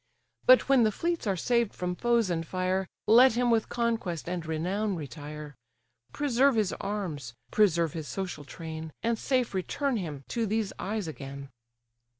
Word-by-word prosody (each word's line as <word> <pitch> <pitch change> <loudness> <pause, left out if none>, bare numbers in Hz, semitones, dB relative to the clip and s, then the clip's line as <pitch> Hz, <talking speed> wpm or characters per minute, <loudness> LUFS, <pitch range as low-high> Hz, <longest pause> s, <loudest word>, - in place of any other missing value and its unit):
But 255 0 +7
when 270 -2 +5
the 220 -2 +4
fleets 335 +2 -2
are 195 -2 +1
saved 235 +4 +1
from 180 0 -2
foes 235 -2 +2
and 165 -1 -1
fire, 185 +2 -1 0.2
Let 240 +4 +7
him 240 +1 +2
with 225 -2 +2
conquest 225 -9 -1
and 175 -1 -2
renown 185 +6 -1
retire; 150 -1 -7 0.6
Preserve 275 -2 +3
his 215 -4 +1
arms, 170 - -4 0.2
preserve 170 -7 +3
his 160 -3 -5
social 185 -6 -4
train, 160 +1 -7
And 230 -1 +1
safe 255 -5 0
return 245 +8 -1
him 150 -8 -5
to 230 -2 -1
these 215 0 -1
eyes 205 -1 -2
again!" 140 -2 -7
195 Hz, 155 wpm, -29 LUFS, 160-235 Hz, 0.6 s, But